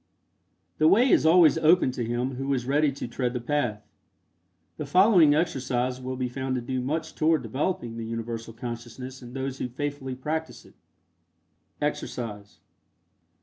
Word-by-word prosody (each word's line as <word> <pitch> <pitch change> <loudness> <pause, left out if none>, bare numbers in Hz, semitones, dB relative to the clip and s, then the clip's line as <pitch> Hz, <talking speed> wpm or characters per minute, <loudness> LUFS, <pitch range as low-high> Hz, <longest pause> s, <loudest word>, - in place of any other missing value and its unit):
The 155 - +5
way 220 +10 +5
is - - +4
always 165 -2 +6
opened 160 -4 +4
to 125 - -3
him 120 +3 -2
who 135 +1 -2
is 125 -2 -3
ready 145 +2 +2
to 135 -2 -6
tread 125 0 -2
the 125 - -2
path. 120 -5 -2 0.9
The 150 - -5
following 180 -2 +6
exercise 130 -5 -1
will 130 0 -4
be 125 -1 -2
found 130 +1 -3
to 125 - -2
do 130 +1 -3
much 155 +5 -3
toward 155 -3 +2
developing 120 - -2
the 115 - -4
Universal 115 0 -5
Consciousness 120 +2 -7
in 120 -1 -11
those 135 0 -4
who 125 - -3
faithfully 135 0 -4
practice 155 +5 -4
it. - - -18 1.1
EXERCISE. 105 -4 -4
130 Hz, 155 wpm, -26 LUFS, 120-150 Hz, 1.1 s, always